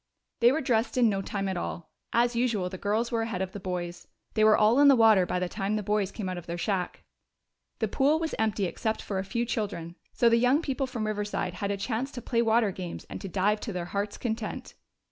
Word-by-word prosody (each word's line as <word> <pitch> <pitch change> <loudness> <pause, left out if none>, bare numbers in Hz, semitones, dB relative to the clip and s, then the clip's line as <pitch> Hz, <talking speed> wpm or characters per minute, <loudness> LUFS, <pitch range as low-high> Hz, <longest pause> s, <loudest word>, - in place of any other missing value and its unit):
They 240 +1 +6
were 310 +4 0
dressed 240 -1 0
in 240 -3 +5
no 195 -2 0
time 195 0 -3
at 190 -1 -2
all; 175 -1 -5 0.2
as 240 +1 +2
usual 230 -6 +1
the 185 0 -8
girls 220 +4 0
were 230 -1 +1
ahead 225 -5 -2
of 190 - -5
the 205 - -7
boys. 175 -2 -5 0.3
They 215 - +2
were 215 0 +6
all 220 +5 +4
in 290 - +7
the 275 - +8
water 220 -6 +5
by - - -1
the 180 0 -1
time 195 +3 -2
the 210 - -2
boys 205 -1 0
came 205 -3 -5
out 185 -1 -3
of 175 - -14
their 170 0 -3
shack. 185 -1 -2 0.7
The 220 - 0
pool 275 +8 +2
was 320 -1 -3
empty 215 -2 +1
except 220 +5 -2
for 195 -2 -3
a - - -2
few 235 +5 -2
children, 200 -8 -3 0.2
so 235 - +2
the 230 0 +5
young 255 +6 +3
people 270 -2 -1
from 240 -4 -3
Riverside 210 -3 -2
had 200 +2 -3
a 200 - -1
chance 225 +6 -2
to 245 - -5
play 235 -2 +1
water 225 -2 +3
games 180 -2 -7
and - - -6
to 195 - -6
dive 200 +3 +1
to 220 - -5
their 180 -1 -3
hearts' 200 +1 -2
content. 225 -2 -4
210 Hz, 245 wpm, -28 LUFS, 190-235 Hz, 0.7 s, the